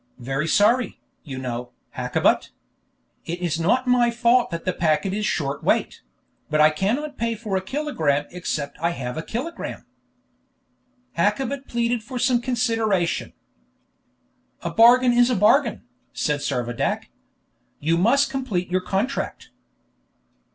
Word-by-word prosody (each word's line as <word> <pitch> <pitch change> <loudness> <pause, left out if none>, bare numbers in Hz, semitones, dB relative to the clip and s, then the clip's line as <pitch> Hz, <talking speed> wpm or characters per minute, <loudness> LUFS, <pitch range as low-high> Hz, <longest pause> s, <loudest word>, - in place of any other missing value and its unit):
"Very 135 +5 -2
sorry, 230 +8 +2 0.2
you 135 -5 -7
know, 125 -1 -5 0.2
Hakkabut. - - +1 0.8
It 170 +2 -3
is 170 -2 -1
not 230 +10 +2
my 245 -1 +3
fault 240 +1 +3
that 170 -1 -5
the 185 - 0
packet 160 +3 +1
is 210 +1 -1
short 140 -2 -2
weight; - - 0 0.5
but 155 - +1
I 155 0 +6
cannot 245 - -2
pay 230 0 0
for 215 -3 -4
a 190 - +1
kilogramme 190 - -1
except 155 -6 -4
I 170 +2 0
have 125 -2 -4
a 160 - -3
kilogramme." 265 - -5 1.3
Hakkabut 265 +8 0
pleaded 235 0 0
for 250 +4 -7
some 245 0 +2
consideration. 225 -7 0 1.3
"A - - -2
bargain 245 +2 +6
is 240 +1 +4
a 250 - +1
bargain," 225 +4 +3 0.3
said 150 -1 -1
Servadac. 120 -4 -2 0.7
"You 160 +3 +1
must 270 +10 +3
complete 215 -10 -2
your 185 0 +1
contract." 200 +9 -3
210 Hz, 130 wpm, -23 LUFS, 160-245 Hz, 1.3 s, I